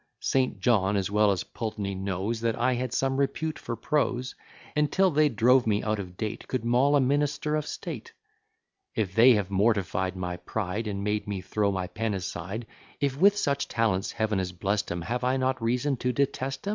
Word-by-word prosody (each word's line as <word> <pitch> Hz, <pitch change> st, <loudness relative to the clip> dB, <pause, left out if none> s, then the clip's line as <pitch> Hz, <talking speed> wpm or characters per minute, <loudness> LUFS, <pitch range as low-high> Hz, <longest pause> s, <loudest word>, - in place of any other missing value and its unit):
St. 130 Hz, -1 st, 0 dB
John, 105 Hz, -5 st, +2 dB
as 95 Hz, 0 st, -1 dB
well 105 Hz, 0 st, +4 dB
as 95 Hz, -3 st, 0 dB
Pultney, 105 Hz, -4 st, -4 dB
knows 95 Hz, +4 st, -2 dB
That 115 Hz, -1 st, +1 dB
I 125 Hz, +2 st, +2 dB
had 125 Hz, 0 st, -2 dB
some 135 Hz, +1 st, 0 dB
repute 155 Hz, +3 st, -1 dB
for 115 Hz, -, -4 dB
prose; 130 Hz, 0 st, -1 dB, 0.4 s
And, 150 Hz, -1 st, +2 dB
till 190 Hz, -1 st, +3 dB
they 150 Hz, 0 st, +4 dB
drove 125 Hz, +1 st, +4 dB
me 105 Hz, -1 st, +1 dB
out 110 Hz, 0 st, 0 dB
of 90 Hz, -2 st, -7 dB
date 110 Hz, 0 st, -4 dB
Could 125 Hz, -3 st, -2 dB
maul 130 Hz, +5 st, +4 dB
a -, -, +5 dB
minister 145 Hz, +3 st, +1 dB
of 150 Hz, -1 st, -2 dB
state. -, -, -6 dB, 0.8 s
If 100 Hz, -5 st, -1 dB
they 120 Hz, +4 st, +7 dB
have 100 Hz, -2 st, -1 dB
mortify'd 95 Hz, -2 st, +1 dB
my 90 Hz, -1 st, -4 dB
pride, 105 Hz, +4 st, -3 dB
And 100 Hz, -1 st, -3 dB
made 105 Hz, 0 st, -1 dB
me 100 Hz, -2 st, -2 dB
throw 100 Hz, +1 st, 0 dB
my 95 Hz, -1 st, -2 dB
pen 105 Hz, +3 st, -2 dB
aside; 95 Hz, +4 st, -5 dB, 0.3 s
If 140 Hz, -2 st, 0 dB
with 200 Hz, +7 st, +5 dB
such 140 Hz, -6 st, 0 dB
talents 110 Hz, -4 st, 0 dB
Heav'n 110 Hz, -2 st, 0 dB
has 90 Hz, -1 st, -2 dB
blest 100 Hz, +3 st, -1 dB
'em, 85 Hz, -1 st, -3 dB
Have 120 Hz, +7 st, -2 dB
I 130 Hz, +1 st, +2 dB
not 130 Hz, -1 st, 0 dB
reason 125 Hz, +4 st, 0 dB
to 125 Hz, +1 st, 0 dB
detest 135 Hz, +2 st, -1 dB
'em? -, -, -1 dB
115 Hz, 200 wpm, -27 LUFS, 100-130 Hz, 0.8 s, they